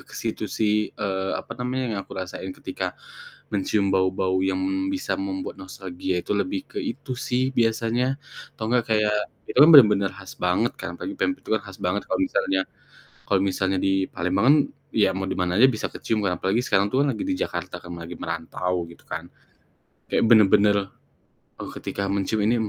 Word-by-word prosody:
ke - - -10
situ - - -3
sih, 105 -1 +1
eee, 95 -1 -2
apa - - -7
namanya, 130 +1 -1
yang 105 - -2
aku - - -11
rasain 95 0 -5
ketika - - -4 0.6
mencium 100 0 +1
bau-bau 95 0 +1
yang 95 0 +1 0.3
bisa 285 -1 -2
membuat 285 -1 -4
nostalgia 95 -1 -4
itu - - -1
lebih 280 - 0
ke 410 - -4
itu 240 - -4 0.2
sih, 125 0 +2 0.2
biasanya. 115 +3 +1 0.4
Atau 110 - -4
nggak 125 -2 +3
kayak 105 -1 +2 0.3
itukan 150 +5 +7
bener-bener 105 -9 +8
khas 100 -1 -10
banget 90 +7 +1
kan, - - -5
apalagi 295 0 -6
pempek 280 - 0
itu - - -9
kan - - -2
khas 95 -2 -10
banget 95 +3 0
kalau - - +1
misalnya 95 - 0 0.7
kalau 100 -2 +2
misalnya 95 0 0
di 95 - +2 0.2
Palembang 90 +3 0
kan 150 - +8 0.4
ya 105 -3 +4
mau 95 0 -2
di - - -1
mana 90 -1 0
aja 130 - +8
bisa 110 - -2
kecium 110 - -2
kan 90 -3 +1
apalagi 100 +6 +1
sekarang 95 +1 +3
tuh 135 +5 +2
kan 145 - +2
lagi - - -4
di 285 - 0
Jakarta 85 0 -4
kan, 85 - -11
lagi 85 +1 -7
merantau 90 +1 -3
gitu 85 - -16
kan. - - -5 0.8
Kayak - - +2
bener 110 -3 +8
bener, 105 0 +5 0.9
eee, - - -6
ketika 100 - -4
mencium 100 +2 0
ini 115 - +3
100 Hz, 185 wpm, -24 LUFS, 95-120 Hz, 0.9 s, bener-bener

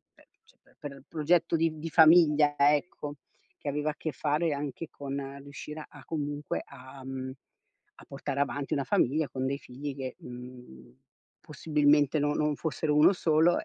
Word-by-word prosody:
per - - -23
eccetera - - -28
per 145 -1 -6
il 135 - -14
progetto 165 +1 +2
di 160 -1 0
di 165 +1 -4
famiglia 155 -3 +6
ecco, 145 0 +1 0.4
che - - -10
aveva 150 +2 0
a 150 - -3
che 155 - -4
fare 150 +1 0
anche 145 +2 -4
con 140 0 -6
riuscire 150 +2 -8
a - - -15
comunque 145 -2 -3
a, 130 +1 -12
mhmm, 130 0 -5 0.6
a - - -16
portare 140 0 -4
avanti 140 0 -1
una 140 -2 0
famiglia 145 +5 +2
con 130 +1 -3
dei 140 +1 -1
figli 140 +2 -7
che, 130 -2 -5
mhmm, 125 - -11 0.5
possibilmente 150 -1 +2
no 145 0 +1
non 150 -1 +1
fossero 155 -1 -1
1 150 - +7
solo 170 -2 +3
145 Hz, 165 wpm, -29 LUFS, 135-155 Hz, 0.6 s, 1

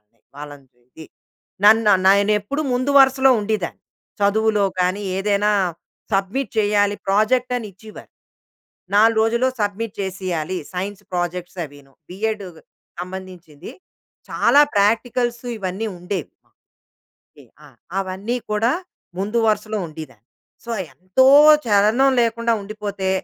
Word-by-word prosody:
అది. 105 +2 -44 0.2
వాళ్ళని 145 -2 -10
చూసి. 125 +6 -15 0.6
నన్ను 215 0 +6
నానెప్పుడు 205 +8 +2
ముందు 255 +3 0
వరుసలో 265 0 +5
ఉండేదాన్ని. 205 -4 -3 0.4
చదువులో 210 +1 +2 0.2
గానీ, 185 +3 0
ఏదైనా 205 +1 +1 0.6
సబ్మిట్ 195 +8 -1
చేయాలి 205 -1 +2
ప్రాజెక్ట్ 240 +6 +1
అని 230 - -5
ఇచ్చేవారు. 215 +3 -14 0.8
4 220 +2 +4
రోజుల్లో 235 +3 +1
సబ్మిట్ 205 +1 -2
చేసేయాలి. 185 -3 -3 0.2
Science 195 +2 -5
projects 175 +1 -4
అవిను. 140 -2 -15 0.2
బిఎడ్ 210 +2 -3
గ్ - - -15 0.4
సంబంధించింది. 180 -4 -9 0.6
చాలా 285 - +4
ప్రాక్టికల్స్ 235 +4 +1 0.2
ఇవన్నీ 195 +3 -4
ఉండేవి. 180 -2 -4 1.1
టె - - -15 0.2
ఆ! - - -15 0.3
అవన్నీ 195 +5 -3
కూడా 215 +3 +1 0.5
ముందు 210 +4 -1
వరుసలో 215 0 0
ఉండేదాన్ని. 150 -9 -11 0.4
సో 235 - -8 0.2
ఎంతో 185 +8 +1 0.4
చలనం 215 +6 +3
లేకుండా 230 0 0
ఉండిపోతే, 200 -2 -4
205 Hz, 110 wpm, -20 LUFS, 185-220 Hz, 1.1 s, నన్ను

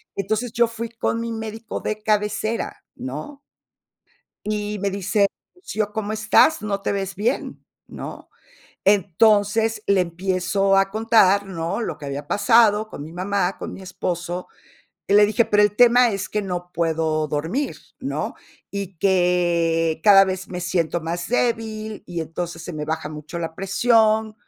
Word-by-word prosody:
Entonces, 220 +4 -2
yo 235 +1 +3
fui 230 0 -6
con 230 0 -2
mi 230 0 -3
médico 225 0 -5
de 215 0 -4
cabecera, 215 +1 -1
¿no? 150 - -7 1.1
Y 210 0 -2
me 200 0 -1
dice: 200 +1 +1 0.3
"Rocío, 215 - -3
¿cómo 215 -1 -3
estás?, 220 +9 +4
no 200 -2 -3
te - - -1
ves 195 -1 -3
bien", 230 +6 -2 0.2
¿no? - - -9 0.6
Entonces, 210 +3 +3
le 200 -1 +4
empiezo 185 +2 +1
a 195 0 +2
contar, 215 -2 +4
¿no?, 170 +2 -3
lo - - -4
que 145 - -8
había 140 +1 -5
pasado 215 0 +4
con 145 - -8
mi 160 - -10
mamá, 185 +1 -1
con - - -6
mi 195 - -10
esposo, 180 -1 -4 0.6
y - - 0
le 205 +1 +7
dije: 215 +3 +2
"Pero 210 -1 +3
el 205 0 +2
tema 245 +1 +6
es 200 0 -4
que 210 - 0
no 180 -2 -5
puedo 160 -2 0
dormir", 165 - -2 0.2
¿no?, - - -3 0.4
y 200 -2 -5
que: 170 -3 +2
"cada 195 -2 +8
vez 190 0 -4
me 180 - -5
siento 175 -1 -1
más 170 +1 -4
débil, 220 -3 -1
y 170 -2 -3
entonces 165 +1 -5
se - - -6
me 150 -1 -5
baja 160 -1 -3
mucho 155 +3 -7
la 165 -1 -4
presión, 220 +3 +2
200 Hz, 155 wpm, -22 LUFS, 175-215 Hz, 1.1 s, cada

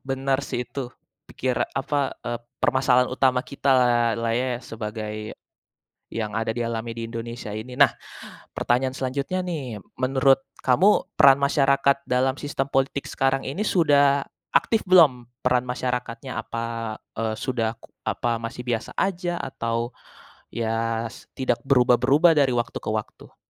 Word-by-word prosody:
Benar 135 0 0
sih, 125 - -3
itu. 130 -1 -6 0.4
Pikira 125 -2 -1
apa, 140 0 0
eee, 120 -1 -2 0.2
permasalahan 130 -1 +3
utama 130 -1 +2
kita 140 0 -4
lah 125 -2 +4 0.2
lah 115 0 0
ye, 125 0 -1
sebagai 110 -2 -6 1.0
yang 110 -2 -3
ada 115 0 -2
dialami 115 -1 -3
di 115 - -5
Indonesia 115 -1 -6
ini. 110 +4 -6
Nah, 140 -2 +6 0.6
pertanyaan 130 +2 0
selanjutnya, 140 +8 -2
nih. 140 - -4 0.2
Menurut 135 +1 +3 0.2
kamu, 170 +12 +3
peran 135 0 +8
masyarakat 140 -1 +3
dalam 130 +2 +1
sistem 145 -2 -3
politik 135 +1 0
sekarang 135 0 0
ini 190 +11 -2
sudah 145 -6 +3 0.3
aktif 225 -1 +2
belum, 155 -10 +5 0.2
peran 125 0 +2
masyarakatnya? 125 0 -3
Apa, 115 -1 -4 0.2
eee, 110 -1 -1
sudah 115 -3 -1
ku - - -16 0.2
apa 120 -1 -1
masih 115 +2 -6
biasa 115 -2 -2
aja 175 -2 -1
atau, 115 -1 -3 0.6
ya 115 0 -1
s - - -14
tidak 130 -3 +1
berubah-berubah 135 +5 +5
dari 135 -3 +3
waktu 120 -1 -2
ke - - -6
waktu? 110 -1 -6
125 Hz, 140 wpm, -24 LUFS, 115-135 Hz, 1.0 s, peran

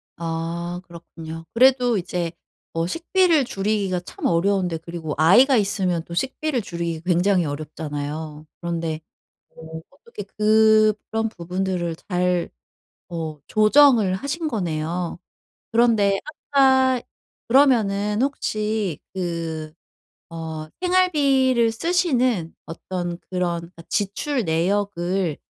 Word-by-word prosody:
아 170 +1 -4
그렇군요. 165 -1 -10
그래도 250 -1 +4
이제 175 -2 -3 0.4
어 165 0 -1
식비를 335 - +2
줄이기가 195 -3 -1
참 180 - -8
어려운데 180 0 +1
그리고 165 -1 -6
아이가 240 - +6
있으면 190 -5 0
또 170 - -9
식비를 265 - -1
줄이기 170 -4 -4
굉장히 180 0 +2
어렵잖아요. 150 +1 -5 0.2
그런데 165 -2 -3 0.6
어 160 0 -9
어떻게 235 -6 -10
그런 215 +1 +3
부분들을 180 -2 -3
잘 180 -1 0 0.6
어 160 -3 -5
조정을 215 -2 +5
하신 280 - -3
거네요. 175 - -2 0.5
그런데 220 -4 +3 0.3
아까 260 -2 +4 0.5
그러면은 220 -5 +3
혹시 215 - -1 0.2
그 165 -4 -4 0.6
어 160 -1 -5 0.2
생활비를 280 -10 +3
쓰시는 255 - +1
어떤 175 +1 -5
그런 180 -2 -1
그러니까 170 0 -13
지출 220 +6 -1
내역을 180 0 0
190 Hz, 240 characters per minute, -22 LUFS, 170-230 Hz, 0.6 s, 아이가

